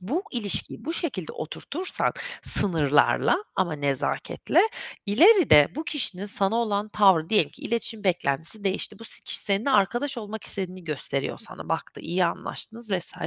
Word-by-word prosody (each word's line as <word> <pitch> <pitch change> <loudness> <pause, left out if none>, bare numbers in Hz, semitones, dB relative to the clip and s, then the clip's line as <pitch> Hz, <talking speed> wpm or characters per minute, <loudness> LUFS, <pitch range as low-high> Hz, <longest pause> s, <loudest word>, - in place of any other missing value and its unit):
Bu 275 - -2
ilişkiyi 220 -6 -2
bu 325 - -3
şekilde 255 - -3
oturtursak 330 - -3 0.2
sınırlarla 155 - +3 0.2
ama 175 -4 0
nezaketle, 140 -3 0 0.5
ileride 240 - +6
bu 310 - -5
kişinin 205 - -2
sana 200 +1 +2
olan 215 -3 -1
tavrı, 190 -6 +3
diyelim 215 - +4
ki - - -15
iletişim 225 -2 -2
beklentisi 175 +3 0
değişti, 195 +3 -2
bu 225 - -12
si - - -1
kişi - - -1
seninle 205 +7 +2
arkadaş 240 +4 +1
olmak 215 0 -7
istediğini 185 -2 -5
gösteriyor 140 -3 -3
sana, - - -10
baktı, - - -4
iyi 180 +1 0
anlaştınız 225 +6 -4
vs. 180 -2 +1
200 Hz, 145 wpm, -25 LUFS, 175-235 Hz, 0.5 s, ileride